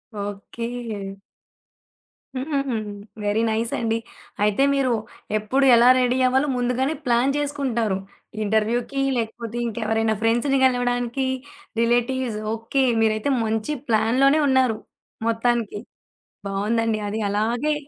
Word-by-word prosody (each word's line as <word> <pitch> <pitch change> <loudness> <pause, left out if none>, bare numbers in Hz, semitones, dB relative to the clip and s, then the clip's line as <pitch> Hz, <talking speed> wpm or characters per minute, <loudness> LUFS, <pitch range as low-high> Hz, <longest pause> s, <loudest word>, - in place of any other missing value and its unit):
Okay. 205 0 -5 1.2
హుహుహు. 275 -1 -1 0.5
Very 205 +2 +1
nice 225 +1 -1
అండి. 225 -1 0 0.5
అయితే 210 +5 +3
మీరు 260 -3 +2 0.4
ఎప్పుడు 255 +6 +1
ఎలా 235 +1 +6
రెడీ 250 0 +2
అవ్వాలో 265 +3 +2
ముందుగానే 250 +4 0
ప్లాన్ 245 +3 +2
జేసుకుంటారు. 260 -8 -1 0.5
ఇంటర్‌వ్యూ‌కి 225 +6 0 0.2
లేకపోతే 230 0 -4
ఇంకెవరైనా 220 -1 0
ఫ్రెండ్స్‌ని 240 +5 +2
గలవడానికి, 245 0 0 0.5
రిలేటివ్స్ 240 0 +1 0.2
ఓకే 245 +4 0 0.2
మీరైతే 220 +5 +1
మంచి 220 +7 -1
ప్లాన్‌లోనే 255 +7 +3
ఉన్నారు 260 -4 +3 0.5
మొత్తానికి. 230 -2 0 0.7
బావుందండి 215 +3 0
అది 215 +2 -3
అలాగే 230 +9 0
235 Hz, 95 wpm, -23 LUFS, 220-260 Hz, 1.2 s, ఎలా